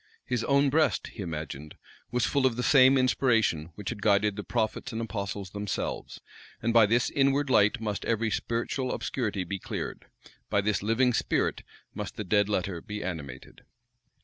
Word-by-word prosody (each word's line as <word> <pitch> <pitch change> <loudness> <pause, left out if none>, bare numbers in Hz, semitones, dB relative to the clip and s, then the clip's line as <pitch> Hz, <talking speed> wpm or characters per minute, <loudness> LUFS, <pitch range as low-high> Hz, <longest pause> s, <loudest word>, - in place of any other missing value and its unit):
His 125 -2 -1
own 140 0 +3
breast, 155 +2 +2
he 110 - -7
imagined, 75 -4 -6 0.3
was 125 0 +1
full 140 -2 +2
of 120 - -2
the 125 - -2
same 135 0 +6
inspiration 115 - +2
which 105 -2 -5
had 105 - -6
guided 105 0 +3
the 105 - -5
prophets 110 +3 -2
and 115 - -4
apostles 100 -4 -4
themselves; 105 -1 -4 0.4
and 115 - 0
by 115 -2 +7
this 115 +3 +2
inward 140 0 +2
light 105 +2 +4
must 105 -2 -3
every 115 -1 0
spiritual 120 +4 -2
obscurity 105 -7 -2
be 95 +2 -4
cleared, - - -6 0.4
by 100 - +2
this 105 +1 0
living 115 +4 +2
spirit - - 0 0.3
must - - -6
the 105 - -4
dead 105 +1 +2
letter 95 -4 -1
be 105 +2 -6
animated. 75 -8 -7
110 Hz, 170 wpm, -28 LUFS, 100-125 Hz, 0.4 s, by